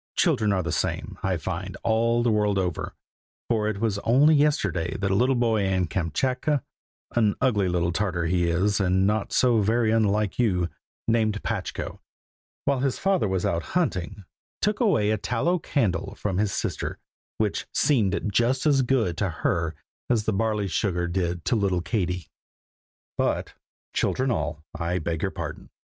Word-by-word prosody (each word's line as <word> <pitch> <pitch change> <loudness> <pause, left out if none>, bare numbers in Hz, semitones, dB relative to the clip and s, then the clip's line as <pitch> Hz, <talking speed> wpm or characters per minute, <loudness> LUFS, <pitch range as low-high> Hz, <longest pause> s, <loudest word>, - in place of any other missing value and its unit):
Children 105 -1 +2
are 95 -2 +1
the 85 - -2
same, - - -2
I - - 0
find, - - -5
all 115 +1 +2
the 120 - +3
world 105 -2 +2
over, 90 -4 -2 0.5
for 110 -2 +1
it 110 -2 -1
was 105 -3 0
only 135 +9 +5
yesterday 145 - +1
that 100 0 -1
a - - +2
little 125 +5 +3
boy 115 -3 +2
in 95 -2 +1
Kamschatka 125 - -1 0.5
(an 110 -4 +2
ugly 105 -7 +2
little 85 -1 +1
Tartar 90 -2 -1
he 85 +1 +1
is, 100 +5 +1
and 95 0 +2
not 105 0 0
so 120 -4 +3
very 110 +2 +2
unlike 105 -2 +1
you), 90 -7 +2 0.4
named 110 -2 +1
Patchko, - - -4 0.7
while 140 -2 +2
his 135 -1 0
father 195 - +1
was 95 -2 -1
out 85 0 0 0.2
hunting, 100 - -1 0.4
took 210 +1 0
away 145 - +3
a 110 - 0
tallow 165 - 0
candle 100 - -1
from 100 -3 -2
his 105 -2 +1
sister, - - -3 0.4
which - - -1
seemed 105 -9 +2
just 125 +6 +2
as 140 -3 +4
good 120 -9 +1
to 100 0 0
her 85 -1 -1 0.3
as 115 -3 +2
the 110 - +1
barley 105 -1 0
sugar 90 0 0
did 85 -1 -2
to - - +2
little 95 -5 +1
Katie. 90 - -2 0.9
But, - - 0 0.4
children 130 0 +1
all, 80 -8 -2
I 85 +1 -2
beg 80 -1 -2
your - - 0
pardon! - - -7
105 Hz, 165 wpm, -25 LUFS, 90-120 Hz, 0.9 s, only